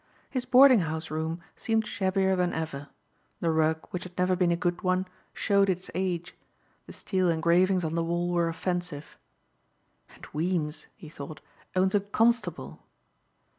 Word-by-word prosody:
His 255 -2 -2
boarding 255 -1 +7
house 160 -2 -3
room 160 +2 -3
seemed 225 -1 0
shabbier 190 -1 +1
than 180 -1 0
ever. 155 -3 -4 0.5
The 165 - +1
rug, 160 0 +1
which 180 - -3
had 180 -1 -11
never 180 0 +2
been 180 -1 +2
a - - +3
good 175 0 -1
one, 185 -1 +1 0.3
showed 200 -1 +2
its 185 0 -2
age. 180 -1 -2 0.5
The - - -9
steel 185 -2 0
engravings 170 +2 +3
on 160 - -2
the 170 0 0
wall 175 +1 -1
were 170 -1 +1
offensive. 175 -3 -4 1.0
"And - - -12
Weems," 155 -1 -2
he 160 - -12
thought, 150 0 -9 0.4
"owns 190 +1 +2
a 205 - +4
Constable!" 225 +4 0
175 Hz, 155 wpm, -28 LUFS, 160-190 Hz, 1.0 s, boarding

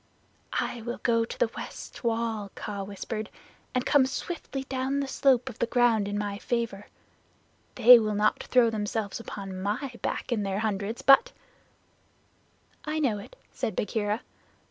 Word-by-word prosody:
"I 235 - -3
will 240 +2 -4
go 230 -1 +3
to - - -8
the 225 - +1
west - - -8
wall," 225 -3 -1
Kaa 200 -1 -5
whispered, 205 +2 -5 0.5
"and 255 - +1
come 290 - +5
down 260 - +3
swiftly 280 0 -4
with 265 - -12
the 270 +1 -1
slope 265 -2 +3
of 245 - -7
the 235 - +1
ground 230 -5 +3
in 205 0 -2
my 205 -1 -3
favor. 230 -4 -2 0.9
They 245 0 +9
will 215 -1 -1
not 210 +1 +2
throw 240 -2 +3
themselves 210 -1 -2
upon 195 -4 -7
my 230 +8 -2
back - - -3
in 230 -3 +1
their 195 -1 -1
hundreds, 215 +1 -2
but 455 - +6 0.8
" - - -38 0.3
"I 305 +1 -2
know 250 -9 +1
it," 350 - -12 0.2
said 215 - -3
Bagheera. 210 +1 -1
225 Hz, 165 wpm, -28 LUFS, 205-250 Hz, 0.9 s, They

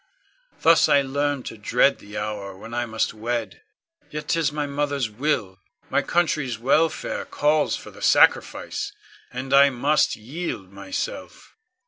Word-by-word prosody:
Thus 165 0 +6
I 140 -1 +5
learned 140 0 -1
to 115 - -7
dread 125 +6 +3
the 105 +1 -9
hour 105 -2 -4
when 115 +4 -10
I 120 0 -1
must 110 -1 -1
wed. 115 +1 -4 0.5
Yet 150 0 -6
'tis 165 -3 +2
my 150 0 -2
mother's 140 -4 -1
will; 105 -6 -1 0.3
my - - +3
country's 150 -8 0
welfare 145 +7 +1
calls 150 +1 +1
for - - -10
the - - -15
sacrifice, - - +2 0.4
and 130 +2 -4
I 140 0 +7
must 140 +4 +2
yield 115 - -6
myself. 285 - -6
135 Hz, 140 wpm, -24 LUFS, 110-150 Hz, 0.5 s, I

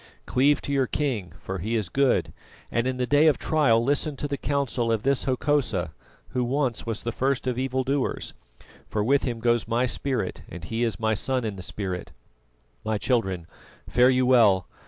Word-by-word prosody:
Cleave 140 +3 +2
to 140 - -2
your 135 -2 +2
king, 120 - -2
for 95 0 -5
he 110 +7 -2
is 110 -5 0
good; 135 +6 +1 0.4
and 115 +2 0
in 130 -1 -1
the 125 - 0
day 145 +4 +4
of 155 - +4
trial 135 -8 +3
listen 145 +3 0
to 145 - -4
the 140 - -2
counsel 135 -4 -1
of 110 -1 0
this 135 0 +1
Hokosa 125 - 0 0.4
who 125 - -1
once 130 -2 -1
was 115 -2 -3
the 120 - -2
first 130 +3 -1
of 125 -1 -1
evil 130 0 0
doers, 135 +1 -2 0.6
for 105 - 0
with 140 +5 +2
him 120 -3 -3
goes 120 0 +1
my 120 +2 +1
spirit, 130 +1 -2
and 85 0 -9
he 115 +7 -2
is 115 -5 -1
my 110 -1 +1
son 130 +4 -1
in 105 -3 -3
the 95 - -8
spirit. 90 -1 -5 0.7
"My 110 0 0
children, 95 -8 0 0.4
fare 125 +1 +4
you 130 0 +3
well! 110 -8 +5
125 Hz, 195 wpm, -25 LUFS, 110-135 Hz, 0.7 s, well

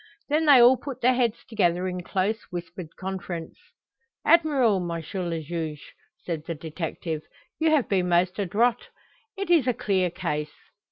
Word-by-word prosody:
Then 310 +2 +2
they 280 -3 +8
all 245 +2 +7
put 275 -1 -7
their 255 +2 +4
heads 240 -3 0
together 185 -5 +1
in 180 0 -3
close, 195 +5 -1
whispered 175 -1 -7
conference. 185 -3 -5 0.7
"Admirable, 285 - +4
M. 170 -2 -3 0.3
le 165 -1 -2
Juge!" 155 -2 -5 0.3
said 165 -3 -3
the 170 - -3
detective. 160 0 -5 0.4
"You 320 0 +3
have 305 -5 +3
been 185 -3 +1
most 180 +3 +2
adroit. 225 +5 +1 0.5
It 390 -2 -2
is 315 -7 +4
a 250 - +2
clear 185 -3 +1
case." 150 -4 -4
185 Hz, 155 wpm, -26 LUFS, 170-245 Hz, 0.7 s, they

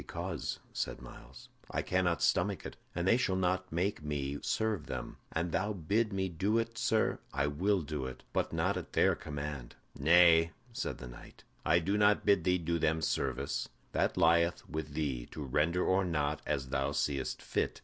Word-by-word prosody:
"Because," - - -4 0.2
said - - -3
Myles, 65 +1 -12 0.2
"I - - -1
cannot 90 -2 +1
stomach - - +1
it, - - -6 0.2
and 85 +1 -1
they 115 - +5
shall 115 -7 +1
not 95 0 0
make 90 +2 0
me 70 -2 -3
serve 110 -8 -1
them. 65 -2 -5
An 85 +1 -1
thou 105 +5 0
bid 105 +5 0
me 95 -1 0
do 95 +6 0
it, 115 0 -1
sir, 110 -3 +2
I 70 -1 0
will 90 +6 +1
do 75 -3 -3
it; 65 0 -9
but - - 0
not - - 0
at - - -7
their - - +4
command." 75 -4 -6 0.2
"Nay," 80 +2 +6 0.2
said - - -3
the 65 - -8
knight, - - -13 0.2
"I 85 - +4
do 100 +5 +1
not 105 0 +4
bid 100 -4 +4
thee 90 0 +4
do 85 0 -1
them 80 +1 +1
service. 65 -4 -1 0.2
That - - 0
lieth 85 +1 +3
with 75 -2 -5
thee, 70 -6 -2
to 75 - -5
render 75 +6 +1
or 95 +1 +3
not, 75 -4 -1
as 70 -3 -1
thou 70 +1 0
seest 70 -2 -1
fit. - - -1
80 Hz, 185 wpm, -32 LUFS, 70-95 Hz, 0.2 s, Nay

